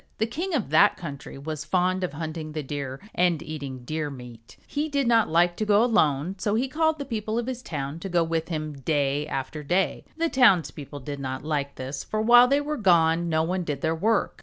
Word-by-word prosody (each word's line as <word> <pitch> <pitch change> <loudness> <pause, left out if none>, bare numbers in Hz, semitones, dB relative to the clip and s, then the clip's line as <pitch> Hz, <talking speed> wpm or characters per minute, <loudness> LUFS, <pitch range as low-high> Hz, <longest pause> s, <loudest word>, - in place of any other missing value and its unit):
The 220 - +1
king 330 +10 -3
of 215 - -2
that 200 +7 +5
country 140 -5 -8
was 150 +1 -5
fond 185 +3 +1
of 180 - -2
hunting 155 0 -5
the 155 -1 -3
Deer 135 -1 -5
and 175 -3 +2
eating 140 -5 -7
deer 155 +1 -2
meat. 125 -3 -12
He 300 +2 -2
did 280 -2 0
not 230 -2 +4
like 175 +2 +3
to - - -1
go 210 +1 +4
alone 180 - +1
so 205 +2 0
he 250 +4 +1
called 315 +3 +1
the 285 - -5
people 220 -3 -3
of 240 - -1
his 255 -1 -4
town 145 - -5
to 195 - -6
go 175 -1 +2
with 165 0 -2
him, 155 -3 -4
day 145 0 0
after 145 +2 -4
day. 180 +6 0
The 330 0 +1
townspeople 170 - +2
did 145 +2 -6
not 130 -1 -4
like 145 -2 -2
this 135 +2 -5
for 215 - -3
while 240 +3 +7
they 280 +2 +2
were 300 +1 -3
gone 170 -4 +3
no 160 0 +2
one 180 +2 -1
did 145 -4 -4
their 160 0 +1
work. 210 +6 0
165 Hz, 220 wpm, -25 LUFS, 145-215 Hz, -, while